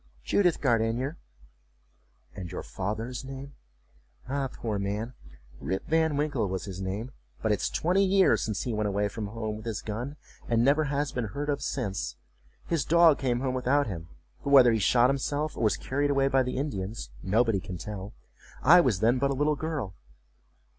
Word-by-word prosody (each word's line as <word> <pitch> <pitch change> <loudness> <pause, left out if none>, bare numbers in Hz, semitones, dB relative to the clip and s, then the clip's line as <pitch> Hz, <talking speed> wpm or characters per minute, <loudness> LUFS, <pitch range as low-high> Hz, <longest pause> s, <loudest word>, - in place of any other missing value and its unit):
"Judith 180 - +2
Gardenier.""And 65 - -4
your 90 - -5
father's 110 +6 -4
name?""Ah, 65 - -8
poor 110 -3 -3
man, 105 +5 -3 0.5
Rip 95 - -3
Van 160 -2 +2
Winkle 145 -9 0
was 95 0 -3
his 95 -2 -6
name, 100 +7 -4 0.3
but 110 - +2
it's 105 - +1
twenty 185 +4 +2
years 195 0 +4
since 105 -3 -2
he 120 - -2
went 105 -1 0
away 100 +1 0
from 105 0 -5
home 110 0 -4
with 110 +2 -9
his 110 -5 -3
gun, 120 +7 -4 0.3
and 115 0 +3
never 150 +3 +4
has 145 0 -1
been 125 -2 -2
heard 140 +8 -4
of 145 -1 0
since—his 65 - -4
dog 165 -1 +5
came 125 -2 0
home 130 -1 -1
without 130 +3 +2
him; 85 -5 -6 0.4
but - - -2
whether 130 -4 +8
he 110 - +1
shot 120 +4 +4
himself, 145 +3 -2
or - - -5
was 110 - +3
carried 145 +2 -1
away 140 -1 +3
by 135 -1 +3
the 125 0 -2
Indians, 105 - -4
nobody 110 - +2
can 90 0 -7
tell. 100 +3 -7 0.5
I 175 +3 +8
was 110 - +1
then 120 +3 +3
but 140 +1 +2
a 140 - 0
little 150 +2 +2
girl." 145 -10 -3
115 Hz, 175 wpm, -28 LUFS, 100-140 Hz, 0.5 s, whether